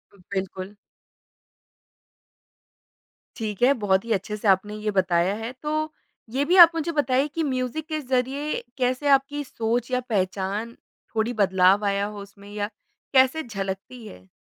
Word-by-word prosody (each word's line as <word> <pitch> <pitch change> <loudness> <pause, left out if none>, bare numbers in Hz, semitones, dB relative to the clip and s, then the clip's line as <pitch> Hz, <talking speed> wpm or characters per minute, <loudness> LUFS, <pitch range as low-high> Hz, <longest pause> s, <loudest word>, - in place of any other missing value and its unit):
बिल्कुल। 190 +1 -6 2.6
ठीक 215 -3 -5
है, 265 +3 +6
बहुत 200 -4 +1
ही 230 - -5
अच्छे 210 +1 -3
से 210 - -3
आपने 200 +2 +2
ये 215 0 -2
बताया 185 -1 +2
है। 225 +2 -5
तो, 310 +3 -3 0.4
ये 270 +5 0
भी 350 +5 +3
आप 340 -2 +11
मुझे 330 +1 -1
बताएँ 280 -3 +1
कि 320 +3 -3
म्यूज़िक 260 +2 -2
के 310 -1 -2
ज़रिए 265 +2 -1
कैसे 255 +2 0
आपकी 280 +1 +2
सोच 235 -1 -2
या 250 - +2
पहचान, 200 +2 -2 0.4
थोड़ी 225 +2 0
बदलाव 195 -1 +3
आया 200 0 +1
हो 205 0 -7
उसमें 200 0 -13
या 205 -1 -2 0.5
कैसे 265 +4 +4
झलकती 205 +1 -6
है? 90 - -13
225 Hz, 145 wpm, -24 LUFS, 200-270 Hz, 2.6 s, आप